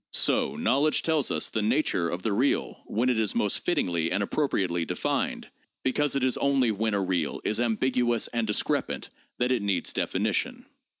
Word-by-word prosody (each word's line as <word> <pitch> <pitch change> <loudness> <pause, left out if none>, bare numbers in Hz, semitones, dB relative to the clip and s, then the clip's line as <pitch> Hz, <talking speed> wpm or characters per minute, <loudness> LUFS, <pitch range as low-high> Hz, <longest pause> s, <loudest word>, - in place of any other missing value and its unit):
So - - +2
knowledge 145 +4 +2
tells 160 -4 +1
us - - 0
the 110 - -1
'nature 110 - +1
of 90 +2 -4
the 110 - 0
real 130 +7 0
when 120 +4 0
it 120 -3 +1
is 110 -3 0
most 105 - +1
fittingly 85 - 0
and 100 +2 +1
appropriately 95 - 0
defined,' - - -2 0.4
because 140 +2 +1
it 135 - 0
is 130 -1 +2
only 135 -4 +2
when 110 +1 -1
a - - +1
real 90 -5 -1
is 110 - 0
ambiguous 120 0 +1
and 115 -2 -1
discrepant 105 - -1 0.3
that 125 +1 +1
it 125 -4 +1
needs 100 -4 0
definition. - - -1
115 Hz, 175 wpm, -27 LUFS, 100-130 Hz, 0.4 s, So